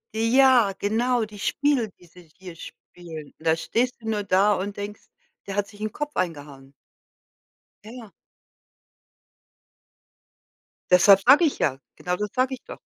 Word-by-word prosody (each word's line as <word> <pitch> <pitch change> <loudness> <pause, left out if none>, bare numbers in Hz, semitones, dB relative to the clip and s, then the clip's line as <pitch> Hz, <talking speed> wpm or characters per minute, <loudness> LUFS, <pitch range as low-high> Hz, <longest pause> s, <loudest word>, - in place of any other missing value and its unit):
Ja, 235 -2 +4
genau, 230 +3 0
die 210 -1 -13
Spiele, 280 -3 0
die 180 - -22
sie 175 0 -18
hier 185 -3 -11
spielen, 160 -2 -11
und 165 - -7
da 160 - +4
stehst 245 +8 -2
du 225 - -11
nur 215 -2 -1
da 200 +2 +3
und 200 +2 -4
denkst: 205 0 -7 0.5
„Der 195 - -5
hat 205 -1 -1
sich 210 -1 -16
'n 215 - -3
Kopf 295 +5 -6
eingehangen.” 145 -6 -5 1.1
Ja, 215 - -11
ja. 235 -4 -11 2.8
Deshalb 190 +2 +7
sage 290 +7 +7
ich 295 - -1
ja 135 -3 0 0.2
genau 180 0 -3
das 210 +2 -4
sage 255 +1 +1
ich 255 - -9
doch. - - -11
205 Hz, 155 wpm, -24 LUFS, 180-240 Hz, 2.8 s, Deshalb